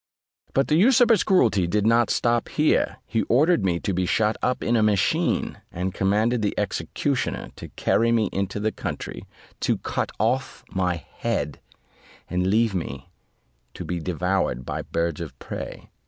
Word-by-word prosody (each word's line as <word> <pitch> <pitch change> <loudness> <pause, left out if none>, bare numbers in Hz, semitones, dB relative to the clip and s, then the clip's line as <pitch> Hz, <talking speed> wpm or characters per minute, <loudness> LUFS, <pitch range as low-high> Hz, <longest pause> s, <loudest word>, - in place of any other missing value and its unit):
But 135 - +3
the 155 - +3
usurper's 230 +2 +5
cruelty 110 - +3
did 105 +3 +1
not 115 +1 +4
stop 120 0 +1
here; 155 0 +1
he 115 -2 0
ordered 150 - +4
me 90 -3 +1
to 100 - -1
be 90 0 0
shut 110 +3 +2
up 125 0 0
in 120 - +1
a 115 - +3
machine, 105 -3 +1
and 90 +1 -3
commanded 110 +5 +1
the 105 - -1
executioner 105 - -2
to - - -8
carry 115 +1 +2
me 115 -3 +2
into 100 +1 -2
the 110 +1 0
country, - - -6 0.3
to - - +1
cut - - -3
off - - -1
my 90 -1 0
head, 85 - -3 0.7
and 90 +1 0
leave 110 +2 +2
me 80 -3 -5 0.6
to - - -6
be 90 -1 -3
devoured 90 -6 -1
by - - -3
birds 85 -2 -2
of - - -7
prey. - - -7
105 Hz, 160 wpm, -24 LUFS, 90-120 Hz, 0.7 s, usurper's